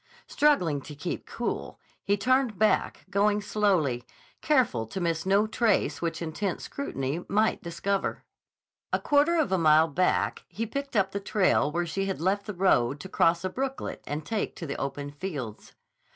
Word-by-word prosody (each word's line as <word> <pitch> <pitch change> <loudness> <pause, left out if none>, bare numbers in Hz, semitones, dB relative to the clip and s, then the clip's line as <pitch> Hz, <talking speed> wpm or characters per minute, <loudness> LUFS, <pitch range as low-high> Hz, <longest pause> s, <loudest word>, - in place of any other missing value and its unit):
Struggling 180 - +2
to 150 +2 -10
keep 145 +5 -5
cool, 240 - -4 0.2
he 200 0 +1
turned 250 0 +2
back, 215 0 +1
going 205 +1 +3
slowly, 190 - +1 0.4
careful 240 - +2
to 190 - -5
miss 165 0 -1
no 200 +2 +4
trace 215 -9 +1
which 170 0 -2
intent 170 +4 -2
scrutiny 155 - -4
might 215 +2 +2
discover. 185 +3 -2 0.7
A - - +3
quarter 295 +4 +3
of 315 -9 +1
a 190 - +2
mile 155 0 +5
back 180 +4 0
he 230 - -4
picked 275 +4 -5
up 195 -2 +2
the 200 - -2
trail 195 -7 +2
where 175 +2 -1
she 195 +4 -2
had 190 - -2
left 195 +4 0
the 210 - -4
road 145 -8 +2
to 190 - -8
cross 170 -1 +2
a 185 - -1
brooklet 270 +3 -4
and 150 +1 -4
take 220 -2 -2
to 165 - -6
the 140 - -4
open 140 +1 -4
fields. 145 - -6
190 Hz, 170 wpm, -27 LUFS, 155-215 Hz, 0.7 s, mile